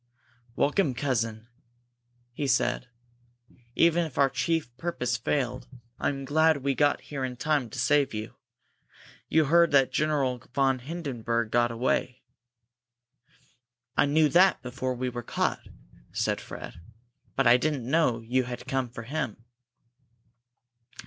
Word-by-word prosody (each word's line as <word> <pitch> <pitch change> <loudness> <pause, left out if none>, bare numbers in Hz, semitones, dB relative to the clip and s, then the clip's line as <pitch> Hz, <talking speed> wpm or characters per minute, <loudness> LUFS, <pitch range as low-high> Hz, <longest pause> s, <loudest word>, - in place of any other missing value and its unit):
"Welcome, 145 -3 +1
cousin," 115 -4 -2 0.9
he 140 +3 -2
said. 130 - +1 0.9
"Even 170 +1 +4
if 155 -6 -7
our 140 -2 +4
chief 135 -1 -1
purpose 130 -6 -2
failed, 120 +1 -2 0.3
I - - +1
am 135 -1 -4
glad 155 0 +3
we 140 0 +1
got 145 +2 +2
here 140 -3 -5
in 125 -1 -4
time 145 -2 0
to - - -9
save 145 -2 +2
you. 110 0 -5 1.0
You 160 -1 +4
heard 170 +3 +5
that 135 -2 +4
General 140 -5 0 0.2
von 135 -2 +2
Hindenburg 120 -6 -3
got 120 0 +3
away?" 125 +2 -1 1.7
"I - - +3
knew 155 +2 +4
that 185 +4 +4
before 130 0 -3
we 130 +1 -3
were 120 0 -5
caught," - - -2 0.4
said - - -1
Fred, - - -9 0.5
"but 135 - +1
I 120 +1 +7
didn't 140 -2 -1
know 135 -5 +2
you 125 +3 0
had 120 0 -7
come 130 -2 -1
for 115 -1 -8
him." 120 -3 -4
130 Hz, 135 wpm, -27 LUFS, 120-150 Hz, 1.7 s, I